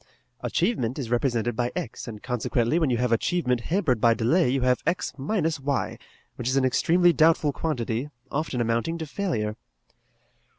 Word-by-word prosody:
Achievement 165 - 0
is 125 -5 -4
represented 120 -2 0
by 120 +1 -1
x, 115 - -5
and, 105 -3 -8
consequently, 125 +3 0
when 160 -5 +2
you 120 - +1
have 125 0 0
achievement 125 0 +1
hampered 155 - 0
by 115 -1 +5
delay 125 +7 +2
you 135 +1 +1
have 125 0 +2
x 180 - 0
minus 160 +1 -1
y, 140 -1 -2 0.4
which 120 - -4
is 130 +2 +1
an 135 - +3
extremely 175 +7 +3
doubtful 155 -2 +3
quantity, 125 -3 -2 0.2
often 145 -4 -2
amounting 115 +8 0
to 160 - -4
failure." 120 - -2
130 Hz, 165 wpm, -26 LUFS, 120-160 Hz, 0.4 s, by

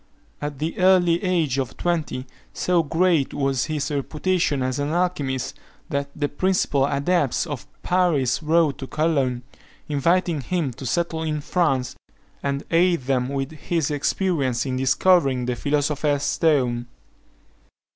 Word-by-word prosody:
At 145 -1 -4
the 160 +6 -3
early 180 -2 +4
age 165 -8 +1
of 130 - -4
twenty, 160 -7 -1 0.3
so 180 -2 +2
great 165 -1 +1
was 135 -3 0
his 155 -1 -2
reputation 150 0 0
as 130 +1 -1
an 145 +1 -1
alchymist, 150 -7 -1 0.4
that 140 -2 -2
the 145 -1 0
principal 145 -4 +1
adepts 145 +1 +1
of 145 -6 -6 0.2
Paris 170 -9 +2
wrote 160 -2 +2
to 135 - -6
Cologne, 135 -6 0 0.4
inviting 165 +2 +1
him 155 -2 -2
to 130 +3 -7
settle 165 +4 -1
in 155 -1 -1
France, 135 -6 0 0.5
and 140 0 -2
aid 170 -1 +3
them 130 -1 0
with 135 0 -3
his 155 0 -2
experience 140 -4 0
in 130 -1 -2
discovering 135 0 +3
the 125 0 -1
philosopher's 145 +1 0
stone. 125 -7 +1
145 Hz, 135 wpm, -23 LUFS, 135-170 Hz, 0.5 s, early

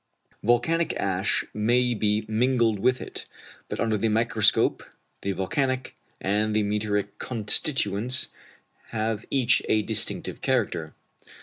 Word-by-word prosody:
Volcanic 125 +9 +2
ash 95 0 0
may 120 +3 +2
be 105 -1 0
mingled 115 -1 +2
with 125 +5 +2
it, - - -7 0.4
but - - -4
under 110 -2 +1
the 115 - +1
microscope 110 -1 +2 0.4
the 100 - -1
volcanic 130 +7 -1 0.3
and 105 +2 0
the 110 - +3
meteoric 105 -1 -1
constituents 120 - 0 0.6
have 110 -1 -2
each 130 -2 +3
a 110 -1 +3
distinctive 110 0 -3
character. - - -1
110 Hz, 115 wpm, -26 LUFS, 105-125 Hz, 0.6 s, the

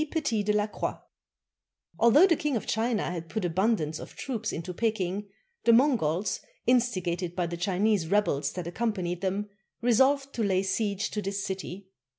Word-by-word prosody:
PETIS 290 -11 0
DE 210 - +2
LA 210 0 +2
CROIX 210 - -4 1.0
Although 235 +10 +7
the 350 -4 +4
King 295 -3 -1
of - - -5
China 225 -3 0
had 165 -2 -6
put 215 -1 -2
abundance 175 -3 0
of - - -10
troops 225 -5 -3
into 180 +3 -5
Peking, 205 -1 -1 0.3
the 235 - +5
Mongols, 220 - +2 0.3
instigated 185 -8 +1
by 175 -1 0
the 170 0 -4
Chinese 190 +1 +1
rebels 170 -7 +1
that 180 -2 -5
accompanied 180 -2 -2
them, 200 +2 -2 0.3
resolved 270 +4 +3
to 235 - -3
lay 190 -2 +2
siege 200 +1 -1
to 210 - -2
this 195 0 -3
city. 190 0 -6
205 Hz, 165 wpm, -28 LUFS, 180-230 Hz, 1.0 s, Although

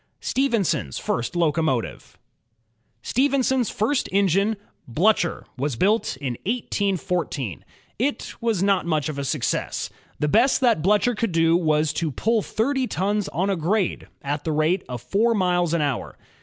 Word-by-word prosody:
Stephenson's 230 - 0
First 120 +7 -2
Locomotive 160 -7 -1 0.9
Stephenson's 265 -2 +1
first 245 +6 0
engine, 200 +2 +2 0.3
Blticher, 175 - +2 0.2
was 140 -1 -1
built 205 - +1
in 130 -4 -4
1814. 185 - -2 0.4
It 280 +5 -1
was 225 -5 +1
not 195 -3 +2
much 155 -3 0
of 145 -2 -4
a - - -2
success. 135 -2 -2 0.3
The 150 - 0
best 235 - +4
that 235 -10 +3
Bltu:her 210 +7 +3
could 225 -2 -1
do 165 0 +3
was 155 -3 +2
to 160 0 -1
pull 220 - +1
thirty 260 +5 -1
tons 205 +1 -1
on 190 +4 0
a - - +1
grade, 185 +4 -1 0.2
at 145 +1 -2
the 160 - -1
rate 155 +5 +1
of 120 -2 -6
four 220 - +2
miles 180 -4 +1
an 170 -1 +1
hour. 140 -4 -3
180 Hz, 145 wpm, -23 LUFS, 155-220 Hz, 0.9 s, best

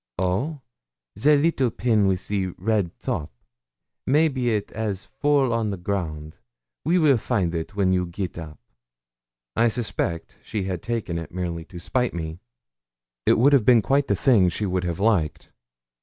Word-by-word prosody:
'Oh! 105 - -1 0.5
the 145 +9 +4
little 145 -4 +2
pin 110 -3 +2
with 95 -1 0
the 100 -2 0
red 100 -2 0
top? 75 - -3 0.8
maybe 140 -3 +2
it 105 -2 -2
'as 105 -3 -3
fall 145 -4 +1
on 115 -2 0
the 100 - -3
ground; 80 -5 -4 0.5
we 170 +5 +2
weel 145 -8 +4
find 100 -8 0 0.2
when 95 -2 +2
you 90 -1 +1
get 90 +1 -5
up.' 80 -4 -8 1.0
I 115 - +4
suspected 100 -7 -3
that - - -34
she 105 -3 -2
had 95 -2 -3
taken 105 -6 -3
it 85 - -8
merely 85 -2 -4
to 90 0 -11
spite 125 +5 -1
me. 80 0 -5 0.9
It - - +5
would 135 +5 +5
have 135 -5 +5
been 120 -2 +5
quite 140 +3 +2
the - - +2
thing 105 -9 +4
she 95 +5 -3
would 90 -1 -1
have 85 0 -3
liked. 100 -8 0
100 Hz, 165 wpm, -24 LUFS, 90-125 Hz, 1.0 s, It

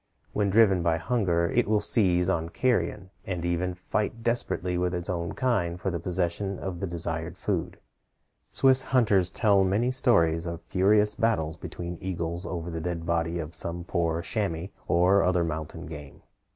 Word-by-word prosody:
When 105 -1 +1
driven 100 -3 +4
by 85 -1 +1
hunger, 85 -4 +1
it 120 -3 +1
will 105 0 +3
seize 90 -5 +2
on 85 -3 0
carrion, 105 -4 -1
and 90 -3 -4
even 90 +1 -1
fight 105 +5 -3
desperately 105 -6 0
with 90 0 0
its 85 +1 -2
own 85 -1 -3
kind 100 -10 0
for 95 - -2
the 85 - -3
possession 90 +2 -2
of 95 -3 -5
the 95 - -2
desired 85 -1 -3
food. - - -2 0.7
Swiss 130 -1 +4
hunters 105 -10 +2
tell 100 -1 +3
many 105 +7 +1
stories 85 -11 +2
of 85 0 -6
furious 105 +3 +3
battles 105 -10 0
between 85 -1 -7
eagles 85 -1 -3
over 85 -1 -4
the 80 0 -4
dead 85 0 -3
body 85 0 0
of 80 0 -5
some 85 0 +1
poor 85 -2 -1
chamois 95 -5 -2 0.2
or 90 +3 +4
other 90 -2 +2
mountain 80 -2 -5
game. 75 -3 -10
90 Hz, 165 wpm, -27 LUFS, 85-100 Hz, 0.7 s, driven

